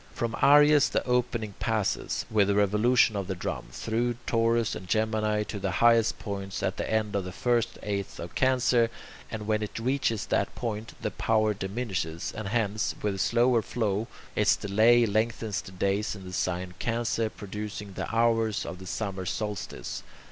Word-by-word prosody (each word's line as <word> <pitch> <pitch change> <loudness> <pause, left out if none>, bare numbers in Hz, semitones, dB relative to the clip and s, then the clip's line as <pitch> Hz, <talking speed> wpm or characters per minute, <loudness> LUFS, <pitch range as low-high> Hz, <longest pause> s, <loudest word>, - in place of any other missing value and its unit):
From 115 -1 -2
Aries 145 0 +6
the - - -1
opening 120 -4 0
passes, 110 -4 -1
with 105 -3 +4
the 100 - +2
revolution 105 +3 +3
of 100 -2 -2
the 95 - -2
drum, 85 - -4
through 115 - -1
Taurus 115 0 +2
and 90 - -7
Gemini 110 0 +1
to 105 0 -6
the 95 -2 -2
highest 115 -1 +4
point 100 -2 -5
at - - -1
the - - -3
end 110 -1 0
of 100 - 0
the 90 - -6
first 120 +4 0
eighth 100 -2 -3
of 85 0 -7
Cancer, 125 -3 +3 0.4
and 110 -1 -5
when 110 0 +1
it 105 - -4
reaches 115 -2 0
that - - 0
point, 110 -1 -4
the - - -1
power 110 -1 +1
diminishes, 95 -5 -3
and 110 -2 -4
hence, 105 -1 0
with 105 -1 +1
the 95 - -6
slower 120 +2 +3
flow, 110 0 -1 0.3
its 105 -1 +4
delay 110 +4 +4
lengthens 110 0 -1
the - - -11
days 100 +3 -1
in 95 - -10
the 90 - -8
sign 90 0 -2
Cancer, 115 -1 0
producing 105 -1 -7
the - - -4
hours 115 -2 +2
of 90 - -6
the 95 - -9
summer 95 -2 -3
solstice. 105 0 -4
110 Hz, 175 wpm, -28 LUFS, 100-115 Hz, 0.4 s, Aries